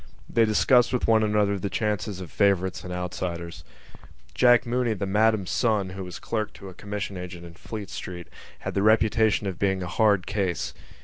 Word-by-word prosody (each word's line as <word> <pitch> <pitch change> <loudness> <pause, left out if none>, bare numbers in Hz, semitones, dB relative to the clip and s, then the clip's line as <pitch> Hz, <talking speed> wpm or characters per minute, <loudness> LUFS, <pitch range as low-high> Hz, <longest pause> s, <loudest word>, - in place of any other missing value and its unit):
They 115 -1 +3
discussed 120 +3 +4
with 125 - 0
one 110 -1 +5
another 105 -2 +1
the 100 - -3
chances 105 -1 -2
of 90 - -8
favourites 95 -2 +1
and 90 - -7
outsiders. 90 -1 -4 0.7
Jack 120 - +5
Mooney, 120 -1 0
the 100 - -3
Madam's 105 -1 +2
son, 105 -6 +1
who 95 0 -6
was 90 -1 -7
clerk 110 -2 -3
to 100 - -10
a - - -11
commission 100 0 -5
agent 90 -1 -8
in 85 - -11
Fleet 105 +3 -8
Street, 90 -1 -7 0.3
had - - -4
the 100 - 0
reputation 110 0 +3
of 95 -3 -4
being 95 -2 +1
a - - -4
hard 100 0 +2
case. 100 -4 -2
100 Hz, 185 wpm, -25 LUFS, 90-110 Hz, 0.7 s, one